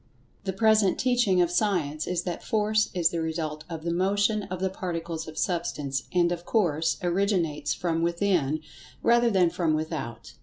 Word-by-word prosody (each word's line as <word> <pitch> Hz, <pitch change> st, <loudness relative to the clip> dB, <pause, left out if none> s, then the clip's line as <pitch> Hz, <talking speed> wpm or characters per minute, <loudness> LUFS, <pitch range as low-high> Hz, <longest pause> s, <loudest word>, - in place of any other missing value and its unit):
The 190 Hz, -, 0 dB
present 215 Hz, -1 st, +3 dB
teaching 245 Hz, -8 st, +3 dB
of 175 Hz, -, -1 dB
Science 175 Hz, -6 st, 0 dB
is 180 Hz, -1 st, -1 dB
that 175 Hz, -2 st, -4 dB
Force 215 Hz, 0 st, +1 dB
is 175 Hz, -1 st, +3 dB
the 170 Hz, -, -2 dB
result 155 Hz, -1 st, -3 dB
of 165 Hz, -2 st, -6 dB
the 170 Hz, 0 st, -1 dB
motion 205 Hz, +4 st, +1 dB
of 185 Hz, 0 st, -4 dB
the 190 Hz, 0 st, -1 dB
Particles 170 Hz, -3 st, -4 dB
of 155 Hz, 0 st, -9 dB
Substance, 150 Hz, -6 st, -2 dB
and, 175 Hz, -1 st, +3 dB
of 175 Hz, -1 st, -3 dB
course, 165 Hz, -7 st, +1 dB
originates 175 Hz, -5 st, 0 dB
from 165 Hz, -2 st, -1 dB
within, 170 Hz, -4 st, +1 dB, 0.4 s
rather 235 Hz, 0 st, +4 dB
than 185 Hz, -5 st, +3 dB
from 165 Hz, -3 st, +1 dB
without. 145 Hz, -8 st, -5 dB
175 Hz, 165 wpm, -27 LUFS, 160-195 Hz, 0.4 s, rather